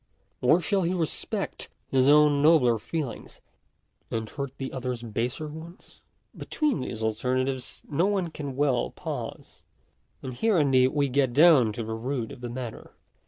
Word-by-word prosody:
or 150 +7 +5
shall 190 +4 0
he 180 +1 0
respect 165 -4 -3 0.2
his 130 0 +3
own 150 -1 +5
nobler 140 -7 +5
feelings, 145 +1 -5 0.7
and 110 -1 -4
hurt 140 -2 -4
the 135 -1 -5
other's 125 -2 -4
baser 120 +6 -3
ones? 160 +4 -12 0.3
Between 300 -5 -1
these 115 -3 -5
al 110 - +2
ternatives 130 +3 -2
no 165 +6 +1
one 190 -5 -1
can 140 -4 -6
well 135 -4 +1
pause. - - -7 0.6
And 130 -1 -5
here 215 - +1
indeed 135 -4 +4
we 140 +1 +1
get 135 -1 +1
down 145 -6 +6
to 115 - -4
the 110 0 -4
root 120 +1 -3
of 125 - -11
the 120 - -5
matter. 120 -1 -7
135 Hz, 160 wpm, -27 LUFS, 120-155 Hz, 0.7 s, down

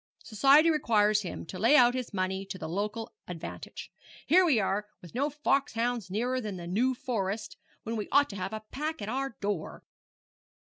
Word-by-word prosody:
Society 275 +9 +5
requires 215 -8 +3
him 185 - -6
to 185 +3 -8
lay 230 +9 +5
out 245 -3 +6
his 255 -1 -4
money 190 -1 -1
to 190 - -6
the 160 - -6
local 210 +6 -3
advantage. 175 -2 -7 0.3
Here 360 +6 +6
we 300 -10 +4
are, 205 +1 -1
with 175 - -13
no 280 +5 0
foxhounds 245 -6 0
nearer 245 +6 -1
than 210 -4 -5
the 175 - -7
New 235 +9 +1
Forest, 215 -4 -3 0.3
when 230 - -3
we 210 -2 -4
ought 285 -2 +4
to - - -8
have 190 0 -4
a 220 0 -5
pack 305 -2 -3
at 205 - -4
our 270 0 -3
door!' 200 -5 -3
220 Hz, 185 wpm, -29 LUFS, 195-260 Hz, 0.3 s, out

